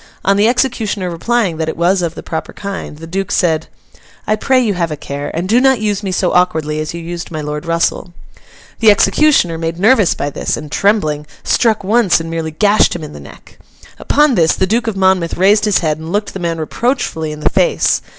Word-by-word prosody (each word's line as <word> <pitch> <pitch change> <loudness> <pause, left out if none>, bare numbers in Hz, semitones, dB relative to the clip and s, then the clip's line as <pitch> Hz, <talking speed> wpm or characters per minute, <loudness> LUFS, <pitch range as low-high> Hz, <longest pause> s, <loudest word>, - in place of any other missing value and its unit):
On 195 - +3
the 205 +2 +3
executioner 225 -7 -1
replying 190 0 -1
that 160 0 -2
it - - -5
was 180 +3 +2
of 170 -1 -3
the - - -8
proper 160 -1 -5
kind, 200 -6 -6
the 165 - -9
Duke 190 +3 -3
said, 160 -2 +1 0.6
'I 215 - 0
pray 260 +4 +2
you 225 -5 +1
have 170 -2 -1
a 150 - -5
care, 140 +1 -5
and 175 +3 -2
do 235 +5 +3
not 265 -2 +3
use 210 -2 -1
me 195 -2 -3
so 180 0 0
awkwardly 160 -4 +1
as 155 +2 -4
you - - -5
used 170 +1 -6
my 155 - -5
Lord 150 +1 -5
Russell.' 170 +1 -1 0.7
The 225 - +5
executioner, 195 - +3
made 165 0 -3
nervous 210 -1 +3
by 145 - -3
this, - - -2
and 150 -1 -9
trembling, 155 -8 0 0.2
struck 220 -4 +1
once 210 -2 +3
and 165 0 -6
merely 165 -1 -3
gashed 205 +7 +2
him 170 - -6
in 150 -1 -8
the - - -9
neck. - - -15 0.4
Upon 295 -1 +2
this, 165 -6 +3
the 190 - +1
Duke 230 +4 0
of 215 -3 -2
Monmouth 190 -3 +1
raised 205 +4 +4
his 210 -3 +3
head 155 0 0
and 160 +1 -7
looked 205 +2 -2
the 195 - -6
man 170 -2 -2
reproachfully 160 - -2
in 150 0 -8
the - - +2
face. - - +2
180 Hz, 220 wpm, -15 LUFS, 160-215 Hz, 0.7 s, The